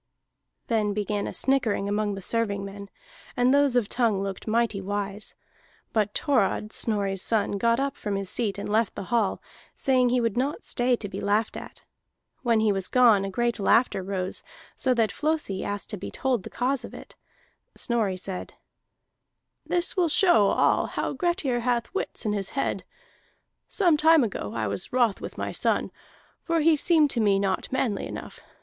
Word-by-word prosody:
Then 210 -3 0
began 210 -1 -2
a - - -4
snickering 235 -7 0
among 205 0 -1
the 195 - -7
servingmen, 200 -2 -2 0.5
and 245 +2 +4
those 285 -2 +3
of 240 -4 +2
Tongue 220 -5 +1
looked 195 +1 -6
mighty 220 -2 +1
wise. 205 +1 -4 0.6
But 210 -2 0
Thorod, 215 -5 +1
Snorri's 200 -4 -1
son, 205 -2 +1
got 235 +2 +2
up 275 0 -1
from 205 -2 -3
his 195 -1 -2
seat 205 0 0
and 200 - -5
left 215 0 +1
the - - -5
hall, 220 -5 +1 0.3
saying 255 -2 +2
he 250 +1 +2
would 230 -3 0
not 280 - -1
stay 245 0 +2
to 220 - -5
be 200 - -6
laughed 210 +2 0
at. - - -8 0.6
When 230 -3 +2
he 215 -1 +3
was 195 -2 -1
gone 235 -6 +5
a 195 - -3
great 235 +4 -1
laughter 205 0 +3
rose, 185 -1 -2 0.3
so 255 -1 +1
that 225 -2 +2
Flosi 300 -11 -1
asked 205 +2 -4
to 210 - -4
be - - -6
told 260 -5 -1
the - - -9
cause 255 0 -1
of - - -9
it. - - -12 0.6
Snorri 220 -6 0
said: 185 0 -6 1.1
"This 350 0 0
will 355 -4 +2
show 305 - +4
all - - +2
how - - -3
Grettir 345 -9 0
has 240 0 +1
wits - - -4
in 210 - +1
his 195 -2 -2
head. - - -1 0.8
Some 350 -7 +2
time 320 -1 +5
ago 190 - -4
I 115 -1 -1
was 100 -1 -4
wroth 240 -5 +2
with - - -7
my - - -3
son, - - 0 0.5
for 335 -1 0
he 320 +1 +5
seemed 305 -1 +3
to 240 - -1
me 205 -3 +3
not 195 -1 -1
manly 250 -6 -1
enough. - - -8
220 Hz, 180 wpm, -26 LUFS, 200-255 Hz, 1.1 s, gone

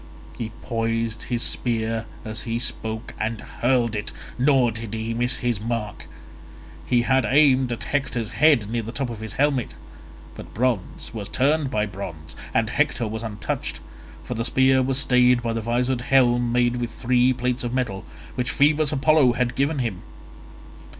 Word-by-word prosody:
He 115 - -4
poised 115 -1 -1
his 120 -2 -1
spear 115 -1 -1 0.2
as 110 0 -5
he 115 -1 -2
spoke 110 -2 -3
and 110 0 -2
hurled 120 -2 0
it, 105 0 -4 0.2
nor 130 -2 +3
did 115 -1 -5
he 110 +1 -3
miss 120 +2 0
his 120 -4 -1
mark. 110 -2 -4 0.8
He 120 -1 +3
had 130 +1 +3
aimed 135 -3 +4
at 120 - -3
Hector's 130 -6 -2
head 145 -9 +4
near 115 +2 -1
the 115 +1 -6
top 125 +1 -3
of 115 - -7
his 110 -1 -5
helmet, 140 -3 0 0.6
but - - -11
bronze 120 -5 -1
was 105 -3 -5
turned 145 +2 +1
by 105 -4 0
bronze, 95 -6 -7 0.2
and 115 0 +1
Hector 135 -5 +1
was 110 +1 -4
untouched, 105 -2 -4 0.4
for - - -4
the 115 0 -2
spear 130 0 +4
was 130 0 0
stayed 125 -3 +4
by 115 -1 -1
the 115 - -2
visored 120 +2 0
helm 120 -2 +3
made 120 0 +2
with 120 -1 -2
three 125 +1 +2
plates 125 0 -1
of 120 - -2
metal, 120 -7 -2 0.3
which 125 -1 -2
Phoebus 150 +2 +3
Apollo 145 -3 +4
had 120 0 0
given 140 +4 0
him. 115 -9 -2
120 Hz, 170 wpm, -23 LUFS, 115-130 Hz, 0.8 s, aimed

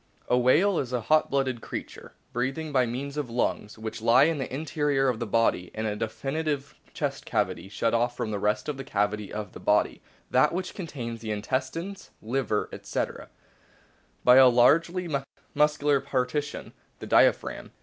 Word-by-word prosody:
A - - +3
whale 165 +10 +4
is 125 -2 -4
a 125 - 0
hot 155 +7 +3
blooded 130 -4 0
creature, - - -7 0.2
breathing 135 +6 -2
by 130 -3 +3
means 140 +5 -5
of 145 -5 -2
lungs, 115 -3 -2
which 110 0 -6
lie 120 +4 +6
in 160 0 +2
the 130 - -4
interior 145 -1 0
of 120 -3 -2
the 120 - -3
body 105 -5 +1
in 110 0 -2
a 105 -1 -1
definite 140 +6 -2 0.3
chest - - -3
cavity, 95 - -2
shut 115 +3 0
off 120 +1 +1
from 110 - -2
the 105 - -2
rest 105 +1 0
of 150 -2 -3
the 135 - -5
cavity 105 -3 -1
of 105 -3 -5
the - - -10
body 105 0 +1 0.3
(that - - +4
which 185 +1 -3
contains 120 - -6
the 110 - -6
intestines, 130 - -3
liver, 115 -2 -1
etc.) - - -4 0.9
by 125 +1 +7
a 130 -1 +9
largely 165 +9 +3 0.5
muscular 150 -1 +3
partition 135 +2 -2 0.2
the - - -8
diaphragm. - - +2
130 Hz, 170 wpm, -27 LUFS, 115-145 Hz, 0.9 s, a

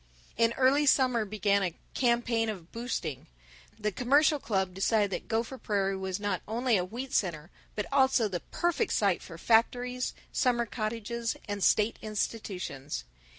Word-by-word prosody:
In 230 0 +3
early 270 +4 +3
summer 250 -5 +4
began 200 -1 +1
a 180 -3 -1 0.2
"campaign 235 -2 +1
of 180 -5 -7
boosting." 230 - -4 0.5
The 210 -1 -1
Commercial 285 +7 +3
Club 190 -6 -1
decided 200 +2 +2
that - - -4
Gopher 230 +3 -2
Prairie 195 -2 0
was 190 0 -3
not 205 -3 -1
only 235 +2 +1
a 180 - +2
wheat 245 +8 -6
center 170 -3 -1 0.2
but 210 - -2
also 265 -4 +4
the 185 -3 -3
perfect 345 - -1
site 200 -4 +2
for 165 - -10
factories, 245 +5 +1 0.2
summer 240 -3 +2
cottages, 230 +1 -3
and 205 -1 -3
state 215 +1 +3
institutions. 195 - -4
220 Hz, 150 wpm, -29 LUFS, 195-245 Hz, 0.5 s, summer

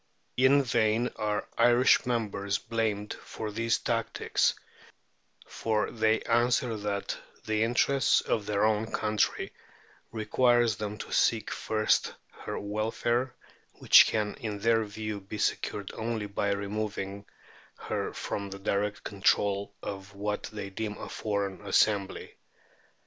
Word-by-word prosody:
In 135 +2 +5
vain 115 -1 +1
are 105 -1 -2
Irish 120 +2 +5
members 100 -4 -1
blamed 110 -3 -2
for 110 -1 -6
these 115 +2 +1
tactics, 115 -1 0 0.9
for 110 -2 -1
they 110 -1 +2
answer 120 0 +2
that 105 -1 -3 0.3
the 110 0 0
interests 125 +4 +3
of 105 -3 -1
their 105 0 +2
own 110 0 +1
country 105 -1 0 0.6
require 120 +2 +3
them 105 -1 -3
to - - -8
seek - - +2
first 110 -1 +1 0.2
her - - -6
welfare, 115 +4 -1 0.4
which - - +7
can 105 -1 -1
in 105 -3 -4
their 115 +2 +2
view 105 0 -5
be 100 +2 -8
secured 100 -1 -1
only 110 -1 -3
by 100 0 -1
removing 100 0 -3 0.5
her - - -3
from 100 -1 -4
the 100 - -7
direct 100 +1 -1
control 100 0 +1
of 100 0 -7
what 105 +1 -3
they 100 -2 -6
deem 105 +1 -4
a - - -7
foreign 100 -3 -2
assembly. 100 -3 +1
105 Hz, 125 wpm, -29 LUFS, 100-115 Hz, 0.9 s, which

